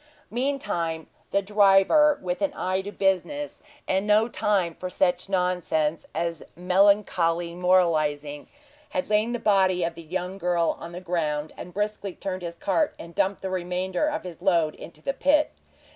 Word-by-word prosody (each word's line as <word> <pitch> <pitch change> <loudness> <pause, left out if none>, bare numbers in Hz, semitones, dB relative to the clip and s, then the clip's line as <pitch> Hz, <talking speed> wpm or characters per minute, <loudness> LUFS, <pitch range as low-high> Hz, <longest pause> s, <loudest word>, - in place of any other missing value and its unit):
Meantime 205 - -2 0.2
the 200 0 +1
driver, 205 +9 +5
with 180 0 -3
an 295 - +1
eye 185 +1 -1
to 200 +2 -7
business, 200 - -1 0.3
and 190 +2 0
no 215 +2 +4
time 200 -7 0
for 185 +3 -6
such 180 0 0
nonsense 180 -4 0
as 165 0 -2
melancholy 180 -2 +2
moralizing, 155 -5 +1 0.4
had 275 -6 -3
laid 215 +2 +2
the 240 - -1
body 190 -5 +2
of 170 0 -1
the 165 - -10
young 180 +3 -4
girl 175 -2 +1
on 170 - -8
the 175 - -6
ground, 155 -4 -2
and 180 - -9
briskly 205 -1 -3
turned 185 -2 -4
his 170 -1 -5
cart 250 - 0
and 170 0 -10
dumped 195 +4 0
the 190 - -2
remainder 185 +6 -1
of 305 - -2
his 175 -2 -9
load 170 -5 +2
into 155 -2 -12
the 275 - -1
pit. 295 +2 +2
185 Hz, 160 wpm, -25 LUFS, 170-205 Hz, 0.4 s, driver